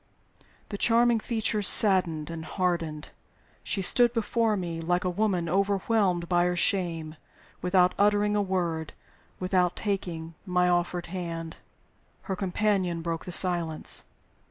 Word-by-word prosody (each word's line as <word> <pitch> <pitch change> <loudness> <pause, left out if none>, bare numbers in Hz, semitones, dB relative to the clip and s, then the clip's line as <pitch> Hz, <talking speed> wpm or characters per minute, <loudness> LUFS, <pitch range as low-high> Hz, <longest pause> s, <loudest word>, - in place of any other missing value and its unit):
The 205 - -6
charming 235 0 +3
features 215 -3 0
saddened 170 -7 +4
and 165 -1 -6
hardened. 170 -5 -2 0.5
She 195 - -2
stood 240 +5 +5
before 225 -1 0
me 170 -3 -4
like 175 +2 0
a 180 - -1
woman 185 -3 0
overwhelmed 195 -1 0
by 175 0 +2
shame 165 -4 -1 0.4
without 180 0 +3
uttering 205 0 +2
a 205 - +2
word, 175 -5 -2 0.5
without 180 -1 +1
taking 175 -5 -4
my 180 -2 +1
offered 175 0 0
hand. 165 -2 -6 0.7
Her 190 - -3
companion 185 -3 -1
broke 165 -1 -4
the 180 - -6
silence. 170 -3 +1
180 Hz, 125 wpm, -27 LUFS, 170-205 Hz, 0.7 s, stood